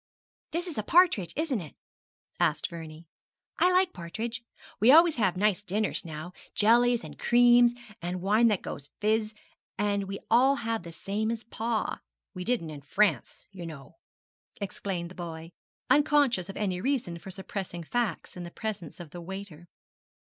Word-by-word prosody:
'This 340 Hz, +2 st, -2 dB
is 335 Hz, -10 st, -4 dB
partridge, 320 Hz, -, +4 dB
isn't 295 Hz, -, -1 dB
it?' 155 Hz, -, -11 dB, 0.6 s
asked 170 Hz, +1 st, +1 dB
Vernie. 160 Hz, -1 st, -9 dB, 0.5 s
'I 360 Hz, -, +5 dB
like 365 Hz, 0 st, +3 dB
partridge. 225 Hz, +7 st, -5 dB, 0.4 s
We 220 Hz, +4 st, +5 dB
always 325 Hz, 0 st, +7 dB
have 190 Hz, -5 st, +1 dB
nice 205 Hz, -1 st, +2 dB
dinners 210 Hz, +2 st, -1 dB
now 160 Hz, +1 st, -7 dB, 0.2 s
jellies, 235 Hz, +2 st, +4 dB
and -, -, -10 dB
creams, 240 Hz, 0 st, +5 dB, 0.3 s
and 175 Hz, +1 st, -3 dB
wine 210 Hz, +5 st, +4 dB
that 210 Hz, -4 st, +1 dB
goes 145 Hz, +1 st, -7 dB
fizz; 215 Hz, 0 st, +1 dB, 0.4 s
and 200 Hz, -1 st, 0 dB
we 195 Hz, +1 st, -5 dB
all 260 Hz, +4 st, +6 dB
have 230 Hz, -4 st, -2 dB
the 170 Hz, -1 st, -9 dB
same 200 Hz, +6 st, -2 dB
as 230 Hz, 0 st, -3 dB
pa. 225 Hz, 0 st, -2 dB, 0.3 s
We 180 Hz, -2 st, -5 dB
didn't 220 Hz, -8 st, -1 dB
in 145 Hz, -2 st, -8 dB
France, 200 Hz, +9 st, 0 dB
you 185 Hz, -3 st, -8 dB
know,' 140 Hz, -, -11 dB, 0.6 s
explained 185 Hz, -3 st, -4 dB
the -, -, -9 dB
boy, 165 Hz, -2 st, -7 dB, 0.4 s
unconscious 285 Hz, -, +3 dB
of 195 Hz, -, -7 dB
any 185 Hz, -4 st, -1 dB
reason 230 Hz, -10 st, -1 dB
for 190 Hz, -, -10 dB
suppressing 190 Hz, -2 st, -5 dB
facts 225 Hz, 0 st, -2 dB
in 180 Hz, -, -7 dB
the 175 Hz, -, -6 dB
presence 190 Hz, -4 st, -6 dB
of 170 Hz, -4 st, -9 dB
the 175 Hz, -, -8 dB
waiter. 180 Hz, -2 st, -8 dB
200 Hz, 160 wpm, -28 LUFS, 175-235 Hz, 0.6 s, always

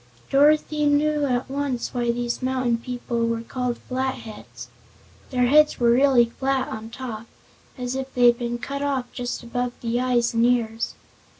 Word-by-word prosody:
Dorothy 300 Hz, +1 st, +3 dB
knew 295 Hz, 0 st, +2 dB
at 250 Hz, -1 st, -1 dB
once 270 Hz, -2 st, -3 dB
why 240 Hz, -1 st, -1 dB
these 240 Hz, +1 st, -3 dB
mountain 255 Hz, -2 st, 0 dB
people 235 Hz, -1 st, -2 dB
were 230 Hz, 0 st, -2 dB
called 250 Hz, 0 st, -3 dB
Flatheads. 260 Hz, -4 st, -5 dB, 0.6 s
Their 250 Hz, -2 st, +2 dB
heads 300 Hz, +4 st, +4 dB
were 235 Hz, -1 st, +4 dB
really 255 Hz, -1 st, +5 dB
flat 265 Hz, +2 st, -1 dB
on 220 Hz, +1 st, -6 dB
top, 230 Hz, -2 st, -7 dB, 0.5 s
as 250 Hz, 0 st, -3 dB
if 265 Hz, 0 st, -4 dB
they 245 Hz, -1 st, +4 dB
had 240 Hz, 0 st, +5 dB
been 240 Hz, 0 st, -2 dB
cut 280 Hz, +3 st, -5 dB
off 275 Hz, -3 st, -2 dB
just 245 Hz, 0 st, -4 dB
above 245 Hz, +1 st, -2 dB
the 235 Hz, 0 st, -1 dB
eyes 245 Hz, -2 st, +1 dB
and 230 Hz, 0 st, +2 dB
ears. 235 Hz, -2 st, 0 dB
250 Hz, 165 wpm, -24 LUFS, 235-265 Hz, 0.6 s, really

